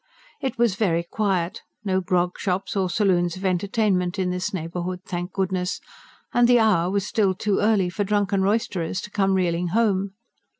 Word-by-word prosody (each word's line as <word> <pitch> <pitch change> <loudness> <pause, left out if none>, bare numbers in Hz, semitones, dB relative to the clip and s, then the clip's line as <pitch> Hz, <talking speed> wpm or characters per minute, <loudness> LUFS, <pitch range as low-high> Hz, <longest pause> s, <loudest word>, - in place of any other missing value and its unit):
It 265 - -3
was 235 -4 +3
very 180 -4 +1
quiet 190 0 -1 0.2
no 190 -1 +1
grog 180 0 0
shops 190 0 -2
or 190 -2 +1
saloons 175 -3 +1
of 190 - -6
entertainment 190 0 +1
in 185 -1 0
this 180 0 -2
neighbourhood, 180 +1 -4
thank 175 -1 -4
goodness! 185 -1 -1 0.5
and 240 0 +5
the 245 0 +6
hour 200 -7 +3
was 200 0 0
still 200 -3 +1
too 205 +1 0
early 205 -3 +3
for 205 +3 -1
drunken 200 -1 +1
roisterers 190 -4 0
to 210 - -9
come 195 -2 +2
reeling 175 -1 0
home. 200 -1 +1
190 Hz, 170 wpm, -24 LUFS, 180-205 Hz, 0.5 s, the